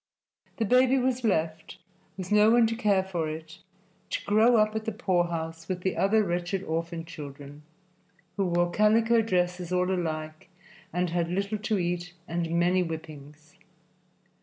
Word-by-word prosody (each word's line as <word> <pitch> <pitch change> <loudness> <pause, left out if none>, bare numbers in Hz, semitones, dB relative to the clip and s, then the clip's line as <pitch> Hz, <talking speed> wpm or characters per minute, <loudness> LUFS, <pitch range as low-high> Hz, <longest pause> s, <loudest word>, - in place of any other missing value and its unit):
The 225 - 0
baby 255 +4 +4
was 255 -1 0
left, 160 -4 -1 0.4
with 185 0 -6
no 210 +1 +6
one 235 0 +5
to 225 0 -1
care 205 -5 +2
for 175 -4 -3
it, 160 +3 -8 0.5
to - - -3
grow 220 +4 +4
up 215 0 +2
at 220 0 -3
the 225 - -1
poorhouse 170 -6 -2
with 180 -1 -3
the 190 0 -1
other 215 +3 +3
wretched 175 +1 -2
orphan 165 0 -3
children, 145 -3 -10 0.7
who 195 -2 0
wore 175 0 +1
calico 225 +3 +4
dresses 180 -4 -1
all 180 0 +1
alike 155 -3 -4 0.4
and 180 -1 -1
had 170 -1 0
little 200 +4 -2
to 215 0 -1
eat 175 0 -2
and 170 0 -2
many 175 +2 +2
whippings. 155 -2 -8
180 Hz, 155 wpm, -27 LUFS, 165-210 Hz, 0.7 s, no